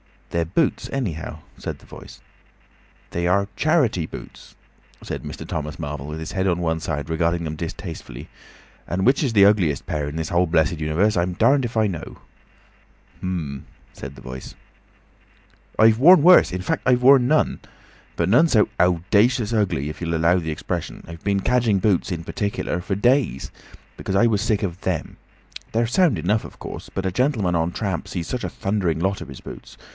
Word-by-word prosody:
"They're 85 -1 0
boots, 135 - 0
anyhow," 80 - -3 0.2
said - - -6
the - - -19
Voice. - - -13 0.9
"They 85 0 -1
are—charity 100 - +1
boots," - - -11 0.5
said - - -5
Mr. - - -7
Thomas 75 -1 -4
Marvel, 75 -3 -5
with 75 +1 -5
his 80 - -6
head 95 0 -1
on 90 -2 +1
one 80 -1 -1
side 75 -1 -4
regarding 85 +1 0
them 80 -1 -4
distastefully; 80 -6 -7 0.6
"and 95 +2 -1
which 135 +5 +3
is 130 -5 0
the 100 -2 +6
ugliest 95 -9 +2
pair 75 -2 -2
in 75 - -6
the 80 - -1
whole 85 +3 +1
blessed 80 -1 +1
universe, 85 +7 +1
I'm 90 +1 0
darned 130 +8 +3
if 115 - -6
I 110 -1 +3
know!" 85 -6 -6 1.0
"H'm," 80 -7 -4 0.3
said 65 +1 -9
the - - -13
Voice. 65 +1 -9 1.2
"I've 110 +1 +5
worn 170 +3 +7
worse—in 165 - +6
fact, 95 - -2
I've 125 -1 +3
worn 130 -1 +7
none. 155 +3 +2 0.6
But - - 0
none 125 +11 +5
so 110 -9 +3
owdacious 105 +7 +2
ugly—if 85 -9 -1
you'll 85 -1 -2
allow 85 +3 +3
the 80 -2 -4
expression. 75 - -4
I've 85 0 -11
been 100 -1 +1
cadging 120 -3 +2
boots—in 90 -3 0
particular—for 95 -1 -3
days. 120 - +1 0.5
Because 95 - -3
I 120 +5 +5
was 105 -3 +1
sick 110 -2 0
of 90 -2 -3
them. - - -3 0.6
They're 115 +1 +2
sound 135 - +2
enough, 100 +7 0
of - - -12
course. - - -8
But 95 - -4
a 95 - 0
gentleman 110 -5 +1
on 85 +1 0
tramp 95 -5 -3
sees 85 -3 -4
such 125 - -3
a - - -3
thundering 95 -5 -1
lot 95 +3 0
of - - -8
his 70 - -10
boots. - - -11
95 Hz, 175 wpm, -22 LUFS, 80-110 Hz, 1.2 s, worn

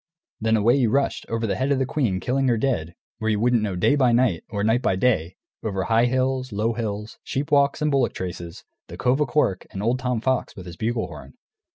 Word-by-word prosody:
Then 110 0 +2
away 115 +5 +4
he 125 - +3
rushed, 135 +5 0
over 115 0 -1
the 105 - 0
head 130 +2 0
of 140 - +3
the 130 - +1
queen, 120 -10 0
killing 130 +5 0
her 120 -2 +3
dead, 85 -10 -1 0.2
where 110 - -1
you 105 -2 +1
wouldn't 120 0 +3
know 100 -3 -2
day 95 +11 +3
by 130 -4 +3
night 120 -8 +2
or 100 -3 -2
night 110 +3 +2
by 95 - +1
day, 95 -6 +1 0.3
over 95 -3 -2
high 115 +1 +3
hills, 130 0 0
low 110 +3 0
hills, 105 -1 -5
sheep 140 +2 -3
walks 140 +1 +3
and 150 - +2
bullock 135 -3 +2
traces, 85 -2 -6 0.2
the - - -9
Cove 130 +4 +1
o' 150 - +2
Cork, 120 -9 0
and 95 - -6
old 120 +3 +1
Tom 125 -2 -1
Fox 130 +2 -1
with 95 - -9
his 85 -2 -8
bugle 115 +3 -1
horn. - - -11
115 Hz, 235 wpm, -24 LUFS, 105-130 Hz, 0.3 s, away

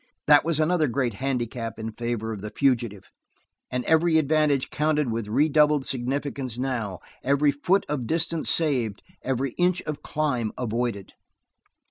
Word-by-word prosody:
That 145 -1 +6
was 165 -2 0
another 160 0 +2
great 125 -1 -1
handicap 120 -2 -3
in 110 0 -5
favor 115 -1 -3
of 100 - -7
the 105 - -5
fugitive, 120 -6 0 0.7
and 125 -1 -2
every 160 0 +4
advantage 150 -2 +2
counted 150 -3 +1
with 115 -2 -3
redoubled 150 +3 +3
significance 130 -1 -2
now, 120 -8 -3 0.2
every 140 +2 +3
foot 175 +8 +1
of 130 -6 -3
distance 165 +1 0
saved, 125 -11 +1 0.2
every 135 0 -1
inch 180 0 +2
of 150 -1 -5
climb 125 -8 -1
avoided. 115 -4 -3
135 Hz, 140 wpm, -25 LUFS, 120-150 Hz, 0.7 s, That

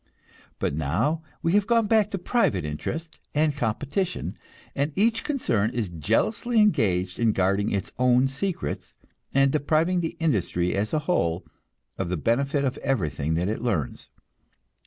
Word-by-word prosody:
But - - -1
now 85 - 0 0.2
we 165 - +2
have 205 0 +3
gone 230 -2 +3
back 215 -1 +3
to 195 - -3
private 175 - +1
interest 160 - -5 0.2
and 150 -1 +2
competition, 145 - -2 0.4
and 145 +2 0
each 225 +3 +2
concern 115 - 0
is 110 -6 -1
jealously 115 - +1
engaged 95 - +2
in 115 -2 +3
guarding 100 +2 +1
its 100 -2 -2
own 125 +1 +4
secrets, 155 +8 -4 0.4
and 135 0 +4
depriving 160 +5 +2
industry 105 - 0
as 105 +2 -1
a - - +1
whole 85 - 0 0.5
of 95 -3 -1
the 90 - -1
benefit 140 - +1
of 130 - -1
everything 80 - -1
that 90 +3 0
it 110 +2 -2
learns. 100 - -2
135 Hz, 145 wpm, -25 LUFS, -, 0.5 s, own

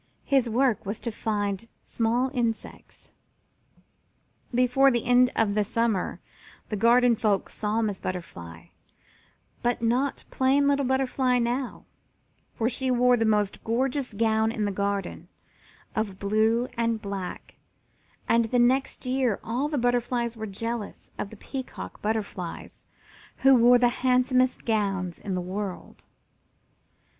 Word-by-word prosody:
His 265 -4 +2
work 245 -1 +1
was 205 +2 -4
to 235 - -3
find 205 -1 -2 0.2
small 240 +3 0
insects. 235 -4 -4 1.4
Before 250 +2 +4
the 240 -3 0
end 250 +1 +5
of 215 -3 +2
the 210 0 +2
summer 225 -2 -1 0.5
the 215 - -2
garden 235 +3 +4
folk 210 -3 0
saw 215 +2 -1
Miss 205 -3 -2
Butterfly, 85 - -7 0.9
but 240 0 0
not 250 +4 0
plain 270 +2 +3
little 280 -1 +2
Butterfly 260 -1 +1
now, 245 +2 -2 0.7
for 225 - 0
she 260 +1 -2
wore 250 0 +4
the 225 -1 +1
most 210 -2 +1
gorgeous 250 +1 -1
gown 220 0 +2
in 215 -2 -2
the 205 - -1
garden, 200 0 -3 0.7
of 210 -3 -2
blue 220 +4 +1
and 230 -1 0
black, 200 -3 -6 0.7
and 230 0 +3
the 245 +3 0
next 255 +3 +2
year 255 -4 0
all 250 +6 -1
the 300 - -3
other 265 - 0
butterflies 240 -1 0
were 220 -1 -5
jealous 230 +2 -5
of 200 - -3
the 220 - -12
Peacock 260 +4 -7
Butterflies, 210 -5 -4 0.6
who 270 - +8
wore 245 0 +6
the 245 0 +4
handsomest 255 0 +2
gowns 195 -6 -1
in 195 -3 -4
the 180 - -1
world. 190 +1 -6
230 Hz, 135 wpm, -26 LUFS, 210-250 Hz, 1.4 s, who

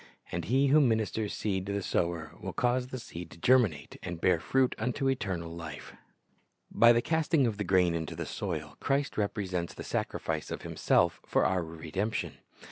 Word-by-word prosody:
And 85 -1 -3
He 135 +6 +3
who 150 +3 +6
ministers 110 -4 +1
seed 95 -3 -2
to 100 - -2
the 100 -1 -2
sower 85 -4 -1
will 95 - -5
cause 125 0 +1
the 130 - -6
seed 90 -8 -8
to - - -13
cferminate 105 - +2
and 85 -2 -5
bear 85 -1 +3
fruit 130 +8 +2
unto 135 +2 -1
eternal 95 -10 -2
life. 85 -1 -8 0.8
By 120 0 +7
the 120 0 +3
casting 160 -2 +2
of 110 -4 -1
the 105 - -1
grain 90 -2 +3
into 80 -2 -3
the - - -4
soil, 75 -7 -4
Christ 140 +1 0
repre 105 -1 -1
sents 90 -2 -3
the - - -7
sacrifice 80 -2 -2
of - - -5
Himself - - +2
for - - +2
our 95 -2 +1
redemption. 85 +6 -3
100 Hz, 185 wpm, -30 LUFS, 85-125 Hz, 0.8 s, By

